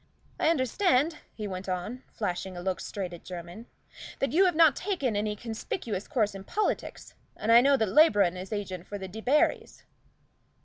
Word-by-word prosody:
I - - +3
understand," 300 - +2 0.2
he 210 -2 -5
went 190 0 -6
on, 185 +8 -4
flashing 185 -3 -4
a - - -5
look 190 -1 -1
straight 185 -3 -5
at 170 - -10
Jermyn, 180 +5 -8 0.5
"that 275 -3 -1
you 370 +6 +5
have 355 -3 +2
not 315 -4 +6
taken 345 - -1
any 210 +1 -1
conspicuous 220 - -5
course 215 -5 0
in 195 -1 -8
politics, 420 - -3 0.2
and 220 - 0
I 235 +1 +9
know 275 +1 +4
that 220 - +1
Labron 205 - +5
is 185 +1 -7
agent 185 -4 -4
for 205 - -5
the 190 -1 -6
Debarrys." 220 +10 0
215 Hz, 175 wpm, -28 LUFS, 190-275 Hz, 0.5 s, I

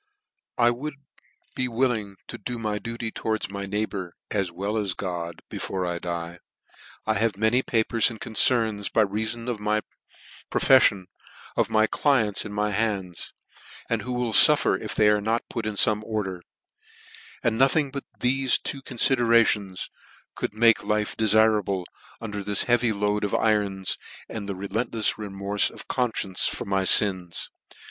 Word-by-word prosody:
" - - -43
I 120 0 +4
would 140 +5 -5 0.6
be 130 - -1
willing 115 -5 -1
to - - -7
do 125 -1 -5
my 105 -2 -2
duty 115 0 -5
towards 110 -3 -3
my 100 0 -5
neighbour, 100 -3 -3 0.2
as 100 -4 -1
well 100 +5 -3
as 100 -5 -1
God, 85 -3 -5
before 95 -1 -4
I 85 -1 -3
die; 85 0 -5 0.7
I 110 - +2
have 110 -1 0
many 110 +4 +2
papers 115 -2 +2
and 115 -2 -9
concerns 110 -2 +1
(by 110 - +3
reafon 110 +4 -4
of 120 -4 -2
my 105 +1 0 0.7
profeflion) 115 -7 +4 0.5
of - - +1
my 110 0 +3
clients 110 -6 +1
in 105 - -6
my 105 +1 -1
hands, 95 -5 -2 0.6
and - - +1
who 125 - -6
will 125 -2 -2
fuffer - - +7
if - - -5
they 105 - +4
are 105 0 +3
not 115 +3 -1
put 115 -3 -3
into 105 -2 -2
fome 110 -2 +1
order: 100 -5 -3 1.0
and 115 0 0
nothing 135 +1 +3
but 140 0 -5 0.2
thefe 130 +1 +2
two 135 - -3
confiderations 115 -7 +1 0.4
could 105 - -4
make 115 0 +4
life 105 0 -1
defirable, 110 -3 +2 0.4
under 105 -3 -5
this 100 0 +2
heavy 120 -1 +2
load 105 0 -1
of 100 - 0
irons, 100 -3 0 0.3
and 105 -3 -6
reftlefs 105 +4 -1
remorfe 100 -1 0
of - - -12
confcience 110 -7 0
for - - -5
my 95 -1 0
fins. 95 -3 +3
105 Hz, 155 wpm, -25 LUFS, 100-115 Hz, 1.0 s, fuffer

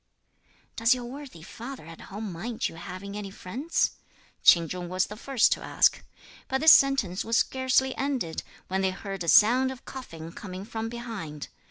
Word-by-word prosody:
"Does 230 +3 +4
your 245 -1 -6
worthy 255 - -9
father 240 - -9
at 165 0 -11
home 205 0 -6
mind 220 +7 -3
your 165 - -10
having 200 +2 -7
any 205 -1 -5
friends?" 245 - -1 0.5
Ch'in 170 -2 +7
Chung 180 +1 -5
was 185 +1 +1
the 210 - -9
first 255 +1 +2
to - - +1
ask. - - +2 0.4
But 265 0 -1
this 315 0 +10
sentence 265 -10 +3
was 230 +1 +1
scarcely 260 0 +2
ended, 265 - -2 0.3
when 190 +1 -1
they 190 - +2
heard 195 0 -5
a - - -6
sound 250 +9 +6
of 260 - -11
coughing 165 -11 -8
coming 185 +1 -8
from 225 0 -4
behind. 225 -11 -6
215 Hz, 175 wpm, -27 LUFS, 185-260 Hz, 0.5 s, this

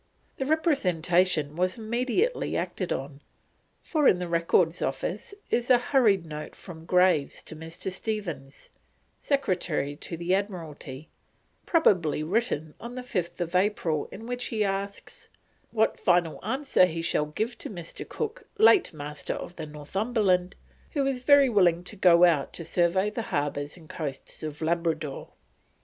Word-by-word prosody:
The 265 - -2
Representation 180 - +2
was 185 +3 0
immediately 250 - 0
acted 185 - -3
on, 140 +1 -4 0.6
for 305 -4 +2
in - - +5
the 180 0 -4
Records 170 0 +2
Office 180 - -3 0.2
is 240 +1 +1
a 250 - +7
hurried 235 -8 +3
note 150 -1 -7
from 165 -3 -11
Graves 180 -5 +2
to 160 - -10
Mr. 165 +4 -5
Stephens, 175 -10 -5 0.5
Secretary 180 - -1
to 165 +1 -7
the 175 +2 0
Admiralty, 160 -7 -4 0.6
probably 180 - +3
written 160 -5 -1
on 240 +2 -8
the 255 - -5
5th 175 -6 -3
April, 180 -6 +1
in 220 - -9
which 245 +1 -3
he 220 -2 0
asks: 200 0 -4 0.4
"what 220 -1 +1
final 175 -3 +2
answer 245 -3 +3
he 165 -1 -4
shall 150 -2 +1
give 220 +11 -3
to - - -5
Mr. 175 -5 -8
Cook, 445 -1 -4
late 415 -3 +6
Master 145 -1 -5
of 175 - -7
the 160 -2 -6
Northumberland, 185 +4 0 0.4
who 280 -2 +1
is 265 -2 -1
very 280 +1 +6
willing 180 -7 +3
to 210 - -6
go 180 -3 +6
out 165 -6 +3
to 165 - -4
survey 185 +5 +2
the 230 - -3
Harbours 145 +2 -2
and 160 -3 -15
Coasts 145 -5 -6
of 155 -1 -6
Labradore." 160 -3 -1
180 Hz, 145 wpm, -27 LUFS, 160-225 Hz, 0.6 s, a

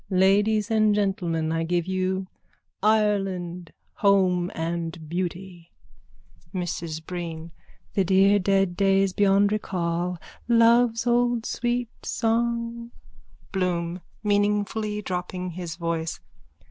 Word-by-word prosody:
_ - - -33
Ladies 205 +3 +3
and 215 -1 +3
gentlemen, 175 -6 0
I 165 0 0
give 170 0 0
you 190 0 -1 0.6
Ireland, 195 -5 0 0.3
home 185 -3 +3
and 165 0 -4
beauty. 175 0 -5 0.8
MRS 165 -3 -4
BREEN: 170 -2 -6 0.4
The 195 - +2
dear 195 +2 +4
dead 195 -1 +1
days 195 0 +2
beyond 200 0 +3
recall. 180 -3 -1 0.3
Love's 235 0 +4
old 240 -1 +2
sweet 240 -1 -1
song. 235 +1 -1 0.6
BLOOM: 180 -2 -1 0.2
_(Meaningfully 210 +1 0
dropping 180 0 -4
his 175 -1 -6
voice.) 165 -1 -3
190 Hz, 100 wpm, -25 LUFS, 175-210 Hz, 0.8 s, dear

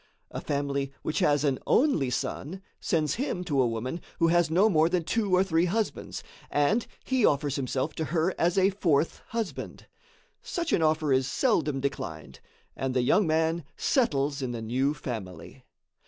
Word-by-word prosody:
A - - -5
family 140 -1 -2
which 155 - -1
has 145 -1 +3
an 135 -3 +1
only 240 - +3
son 165 +8 -4 0.2
sends 155 -5 0
him 185 -10 -2
to 145 -7 +1
a 125 - +3
woman 120 +8 -3 0.2
who 165 - +3
has 175 -1 +3
no 185 +6 +4
more 160 -5 +3
than 180 -1 0
two 210 +3 -1
or 185 - +4
three 170 -2 +2
husbands, 215 +4 -2 0.3
and 165 +11 +1 0.2
he 260 -3 0
offers 145 -3 +2
himself 135 +2 -2
to 160 - -3
her 170 +3 0
as 175 +3 +2
a 190 +1 +4
fourth 165 -6 +1
husband. 225 -3 -5 0.6
Such 340 -4 -3
an - - +3
offer 155 -2 +2
is 130 0 +2
seldom 155 - +1
declined, 80 - -5 0.4
and 135 -1 -3
the 125 - +2
young 200 - +3
man 160 +1 +1
settles 145 - +1
in 125 -2 -3
the 115 - -5
new 130 +6 0
family. 95 - -7
155 Hz, 170 wpm, -28 LUFS, 135-180 Hz, 0.6 s, no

